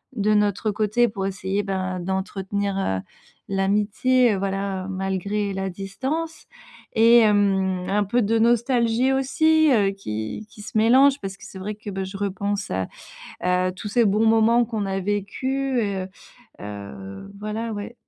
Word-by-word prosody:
de 215 0 +2
notre 210 +1 +1
côté, 215 +3 +2
pour 195 -2 -3
essayer, 195 +1 -2
ben, 185 -2 -2
d'entretenir, 195 +2 -2
heu, 95 - 0 0.5
l'amitié, 210 +5 +2
heu, - - -1
voilà, 195 -1 -2
malgré 195 +2 -2
la 190 0 -2
distance 260 - -4 0.5
et 230 +1 +6
hem, 195 -4 +2
un 205 +1 +2
peu 240 +5 +1
de 225 +2 +2
nostalgie 235 +1 +2
aussi, 315 +4 +3
heu, 205 -5 +3
qui 110 - -5
qui 210 - -13
se 205 - -10
mélange, 265 +5 +5
parce 195 0 -6
que - - -17
c'est 190 - -10
vrai 210 +3 -4
que, 210 0 -9
bah, 190 0 -3
je 195 +1 -7
repense 200 0 -2
à 95 0 -1 0.5
à 180 0 +1
tous 200 +3 -7
ces 235 +1 +3
bons 210 +3 +3
moments 225 +2 +4
qu'on 220 -3 -3
a 195 0 -1
vécus. 250 +7 -1
Heu 195 -3 -2 0.5
heu, 100 - -8
voilà, 215 +2 -4
ouais. 205 +3 -6
205 Hz, 155 wpm, -23 LUFS, 190-230 Hz, 0.5 s, et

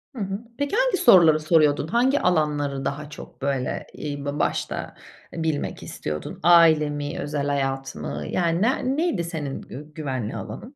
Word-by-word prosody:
Hı - - -7
hı. 195 0 -3 0.2
Peki, 285 +7 -1
hangi - - +2
soruları 170 - +6
soruyordun? 155 -2 +3
Hangi 255 - +2
alanları 145 -5 0
daha 145 +2 -4
çok 150 - -12
böyle, 135 -2 -2
eee, 145 -1 -5
ba 145 +1 -3
başta - - -2 0.4
bilmek 160 -3 -2
istiyordun? 75 0 -6
Aile 165 -3 +6
mi, 145 0 -4
özel 145 -1 -2
hayat 135 -1 -2
mı? 75 0 -5
Yani 170 0 0
ne 255 +4 +1
neydi 320 - 0
senin 155 -5 -5
gü 150 +3 -10
güvenli 130 -8 -3
alanın? 260 +4 -8
150 Hz, 155 wpm, -24 LUFS, 140-175 Hz, 0.4 s, soruları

